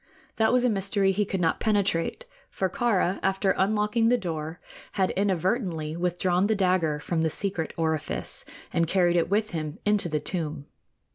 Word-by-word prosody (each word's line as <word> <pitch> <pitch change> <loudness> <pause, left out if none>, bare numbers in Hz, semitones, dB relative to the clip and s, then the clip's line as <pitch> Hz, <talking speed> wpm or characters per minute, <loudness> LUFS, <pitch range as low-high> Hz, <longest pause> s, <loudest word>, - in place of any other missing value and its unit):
That 220 0 +3
was 250 0 +3
a - - +4
mystery 195 -1 +1
he 205 +2 0
could 190 -1 -3
not 165 -1 +1
penetrate; 205 - 0 0.2
for 190 -2 -2
Kāra, 195 -5 +1
after 195 0 +1
unlocking 210 +3 +2
the 245 - +4
door, 160 -4 -4 0.3
had 190 -1 +1
inadvertently 185 -4 -1
withdrawn 180 +2 +1
the 220 - +2
dagger 180 -6 +1
from 160 +2 -1
the 160 - +2
secret 180 -1 -2
orifice 160 -2 -2 0.3
and 170 0 +2
carried 175 -1 +2
it 170 - +2
with 215 +2 +1
him 155 -1 -4
into 210 -4 +2
the 155 -1 0
tomb. 150 -3 -4
185 Hz, 165 wpm, -26 LUFS, 165-205 Hz, 0.3 s, a